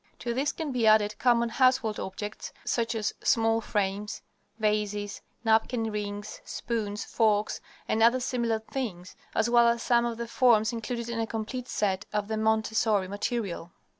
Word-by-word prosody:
To 235 - -3
these 275 +4 0
can 315 -3 -4
be 240 -3 +1
added 215 -1 +4
common 235 -2 +3
household 255 -3 +2
objects 205 +2 -6
such 230 -1 0
as 215 -1 -1
small 225 0 +3
frames, 205 0 -2 0.3
vases, 210 -1 -1 0.2
napkin 225 +1 +2
rings, 205 0 -5
spoons, 210 -3 -3
forks, 215 -2 +1 0.3
and 220 - +1
other 235 +3 +5
similar 240 -3 0
things, 220 -6 -5 0.2
as - - +2
well 235 0 +5
as 235 0 +1
some 240 -1 +3
of 230 -1 -4
the 235 0 -4
forms 230 -2 +4
included 235 +1 -4
in 235 -1 -3
a 225 - 0
complete 235 +3 -4
set 200 -3 -1
of 210 0 -2
the 220 - -1
Montessori 220 -2 +2
material. 200 -3 -3
220 Hz, 160 wpm, -28 LUFS, 210-235 Hz, 0.3 s, other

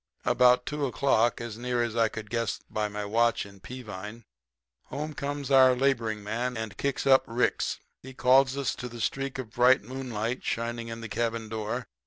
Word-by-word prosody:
"About 125 0 +4
two 150 -2 -1
o'clock, 120 -1 +2
as 115 -1 -6
near 125 0 0
as 115 -1 -3
I 115 -1 +4
could 105 -1 -8
guess 115 -2 -1
by 105 -1 0
my 105 0 -5
watch 115 +2 +2
in 100 -1 -14
Peavine, 105 -1 -8 0.6
home 150 +3 -5
comes 140 -1 -4
our 130 -1 +7
laboring 115 -5 0
man 120 +4 -2
and 110 -3 -5
kicks 140 +5 -2
up 135 -1 +6
Ricks, 120 +2 0 0.3
and 130 0 -11
calls 130 +1 +4
us 130 -7 0
to 125 - -5
the 120 0 -9
streak 135 +3 -2
of 125 -4 -6
bright 125 +1 +4
moonlight 125 -1 -4
shining 115 0 -2
in 115 0 -6
the 115 - -5
cabin 115 +1 -2
door. 110 -1 -3
120 Hz, 185 wpm, -28 LUFS, 110-130 Hz, 0.6 s, our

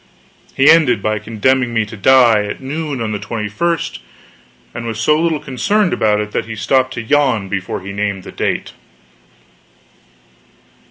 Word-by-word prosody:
He 135 - +4
ended 150 -10 +5
by 110 0 0
condemning 120 +3 0
me 110 -1 +2
to 110 +2 -10
die 115 0 +4
at 105 - -5
noon 140 0 -4
on 110 -1 -2
the 105 - -3
21st; 115 +10 -3 0.7
and 115 0 -6
was 110 -1 -4
so 150 +7 +3
little 165 -2 0
concerned 185 - 0
about 105 -1 +2
it 105 0 -4
that - - -2
he 110 - -6
stopped 130 +4 +1
to 120 - -4
yawn 130 -6 +1
before 95 -1 -3
he 100 +2 -7
named 100 -2 -2
the - - -10
date. - - -3
115 Hz, 160 wpm, -17 LUFS, 105-135 Hz, 0.7 s, ended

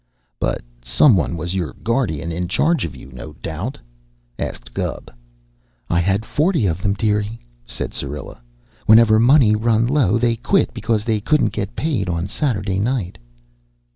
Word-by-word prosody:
"But - - -1 0.2
some 80 - +5
one 85 -1 0
was 85 +3 -4
your 85 -8 -2
guardian 105 - -1
in 90 +2 -2
charge 160 - +1
of 80 - -7
you, 65 - -12
no 65 - -9
doubt?" 95 - -5 0.6
asked - - -6
Gubb. - - -4 0.8
"I 85 - +3
had 95 +5 +1
forty 155 - +1
of 85 -1 -1
them, 100 +1 +1
dearie," 105 +1 -1 0.3
said - - -5
Syrilla. 70 -3 -6 0.5
"Whenever 110 0 +7
money 120 -2 +5
run 115 +1 +2
low, 125 -6 +2
they 115 0 +1
quit - - +1
because 110 -1 -1
they 110 -3 0
couldn't 115 -3 +2
get 100 -1 -4
paid 130 - -1
on 85 0 -1
Saturday 100 - -1
night." 105 -4 -2
105 Hz, 155 wpm, -20 LUFS, 90-115 Hz, 0.8 s, Whenever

